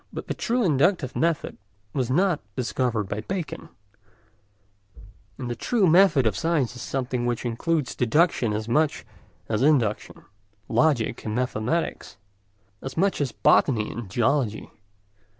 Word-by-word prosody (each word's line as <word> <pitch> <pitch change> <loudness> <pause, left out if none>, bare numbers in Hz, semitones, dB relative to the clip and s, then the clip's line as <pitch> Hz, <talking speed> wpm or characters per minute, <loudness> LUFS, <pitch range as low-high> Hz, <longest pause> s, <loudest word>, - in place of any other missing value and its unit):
But - - -6
the - - -2
true 240 +1 0
inductive 155 - +2
method 165 -1 -1 0.3
was 130 -3 -1
not 175 +4 +2 0.2
discovered 125 -3 -1
by 100 +2 -4
Bacon, 180 - -5 1.7
and 125 - -5
the 120 - -3
true 225 - +1
method 170 -6 +5
of 110 -4 +1
science 155 -7 0
is 125 - -8
something 125 -2 -2
which 120 0 -2
includes 130 +3 -1
deduction 125 -1 +2
as 110 +1 -3
much 150 +5 +1 0.4
as 110 0 -1
induction, 130 -8 +1 0.4
logic 120 -1 +1
and 110 -1 -3
mathematics 125 +5 -2 0.6
as 135 +2 -7
much 195 -2 +1
as 135 -4 -1
botany 110 -4 +2
and 115 -5 -7
geology. 120 +1 0
130 Hz, 135 wpm, -25 LUFS, 115-160 Hz, 1.7 s, method